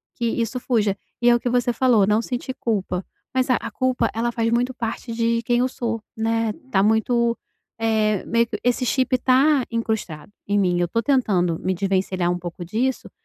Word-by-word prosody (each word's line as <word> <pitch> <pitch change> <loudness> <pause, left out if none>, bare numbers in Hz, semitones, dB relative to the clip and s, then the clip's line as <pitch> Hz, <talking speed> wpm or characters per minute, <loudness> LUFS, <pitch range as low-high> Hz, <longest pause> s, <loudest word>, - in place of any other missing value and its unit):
que 235 - -2
isso 230 +2 -1
fuja, 215 -6 +1 0.3
e 240 - +5
é 240 - +6
o - - +1
que 245 - -2
você 245 0 +1
falou, 235 -5 +4
não 210 +2 +3
sentir 250 +2 -4
culpa, 195 -5 -1 0.3
mas 260 0 +1
a 255 - +5
a 230 - -6
culpa, 250 0 0
ela 235 +2 -1
faz 230 -1 0
muito 245 +2 +1
parte 230 0 -5
de 230 0 +1
quem 240 +1 +1
eu 250 - +2
sou, 230 -3 -3 0.2
né, 225 0 0 0.2
tá 195 - +3
muito, 230 +3 +2 0.4
eh, 220 -3 +1
meio 235 0 +2 0.2
esse 245 +1 +1
chip 255 +1 +1
tá 265 +2 +3
incrustado 220 -8 -3 0.2
em 205 +1 +1
mim, 180 -3 +2
eu 175 - +1
tô 230 +7 0
tentando 195 - +1
me 185 - -1
desvencilhar 185 -1 0
um 175 - -2
pouco 175 0 -7
disso, 235 +9 -2
230 Hz, 195 wpm, -22 LUFS, 205-245 Hz, 0.4 s, é